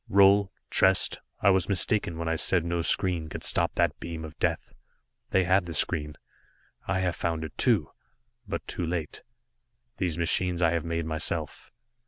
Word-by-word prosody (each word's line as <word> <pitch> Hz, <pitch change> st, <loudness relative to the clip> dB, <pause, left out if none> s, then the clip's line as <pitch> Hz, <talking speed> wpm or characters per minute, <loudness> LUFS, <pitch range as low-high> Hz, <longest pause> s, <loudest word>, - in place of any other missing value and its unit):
"Roal 100 Hz, 0 st, +5 dB, 0.2 s
Trest 95 Hz, -1 st, +3 dB, 0.2 s
I 100 Hz, -, +5 dB
was 95 Hz, 0 st, +1 dB
mistaken 100 Hz, -2 st, 0 dB
when 85 Hz, 0 st, -4 dB
I 80 Hz, -, 0 dB
said 85 Hz, +1 st, +3 dB
no 85 Hz, 0 st, -1 dB
screen 85 Hz, -2 st, +2 dB
could -, -, -7 dB
stop -, -, +1 dB
that -, -, 0 dB
beam 80 Hz, -1 st, -6 dB
of 80 Hz, 0 st, -11 dB
Death. -, -, -2 dB, 0.6 s
They 95 Hz, -, +2 dB
had 95 Hz, 0 st, +2 dB
the 85 Hz, -, -6 dB
screen, 75 Hz, -1 st, +1 dB, 0.7 s
I 95 Hz, -1 st, 0 dB
have 90 Hz, -2 st, -1 dB
found 80 Hz, -1 st, -3 dB
it, 80 Hz, -, -8 dB
too -, -, +1 dB, 0.6 s
but 100 Hz, -, -5 dB
too 90 Hz, -, -4 dB
late. 80 Hz, -3 st, -4 dB, 0.8 s
These 85 Hz, -4 st, -2 dB
machines 85 Hz, +1 st, +1 dB
I 85 Hz, -2 st, +3 dB
have 85 Hz, -2 st, -1 dB
made 85 Hz, -1 st, -3 dB
myself. 80 Hz, -1 st, -2 dB
85 Hz, 170 wpm, -27 LUFS, 80-95 Hz, 0.8 s, Roal